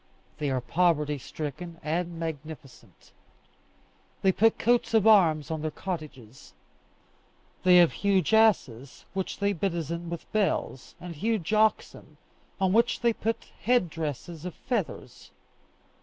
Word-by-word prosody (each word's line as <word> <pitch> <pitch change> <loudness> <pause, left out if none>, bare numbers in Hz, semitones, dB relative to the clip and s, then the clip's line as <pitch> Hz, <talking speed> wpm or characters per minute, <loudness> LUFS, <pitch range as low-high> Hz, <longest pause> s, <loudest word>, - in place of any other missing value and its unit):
They 145 -2 -1
are 130 -1 -1
poverty 150 0 +1
stricken 160 +5 -7
and 170 +2 -2
magnificent; 155 -4 -9 1.1
they 190 - +5
put 225 +4 +3
coats 240 -1 +1
of 220 -2 +4
arms 165 -9 +4
on 160 -1 -3
their 155 - -2
cottages; 150 - -8 1.1
they 180 -1 +6
have 175 -2 +6
huge 200 +1 +1
asses, 140 - +2
which 190 -1 -3
they 200 0 0
bedizen 170 -2 -3
with 170 -1 -7
bells, 200 -10 -1
and 175 -1 -8
huge 215 +2 -1
oxen, 215 0 0 0.4
on 190 -1 +2
which 235 +2 +2
they 235 -1 +3
put 225 +1 -4
head 240 -9 +2
dresses 160 +1 -5
of 180 -1 -6
feathers. 225 -9 -4
175 Hz, 125 wpm, -27 LUFS, 155-205 Hz, 1.1 s, they